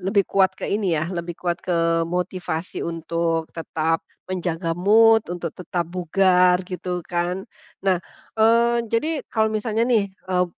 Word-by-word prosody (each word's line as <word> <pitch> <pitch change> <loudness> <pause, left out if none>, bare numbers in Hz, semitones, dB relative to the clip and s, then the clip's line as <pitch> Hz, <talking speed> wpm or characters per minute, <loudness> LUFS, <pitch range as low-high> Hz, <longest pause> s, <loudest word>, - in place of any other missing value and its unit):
lebih 195 +2 +2
kuat 190 0 +2
ke - - -6
ini 195 -5 0
ya, 155 +4 -2
lebih 170 -1 -4
kuat 175 -1 -2
ke 165 -1 +1
motivasi 180 -1 -3
untuk 165 0 -2
tetap 165 0 -1 0.2
menjaga 175 -2 -2
mood 220 +6 +5
untuk 175 -2 -4
tetap 175 -1 -3
bugar, 180 0 +3
gitu 180 -1 -4
kan. 175 +2 -2 0.4
Nah, 185 -2 +3 0.4
eee, 235 +2 +4
jadi 290 +8 0
kalau 220 -1 +1
misalnya 220 +1 0
nih, 225 -5 +2
eee, 185 -1 -1
180 Hz, 140 wpm, -23 LUFS, 170-200 Hz, 0.4 s, mood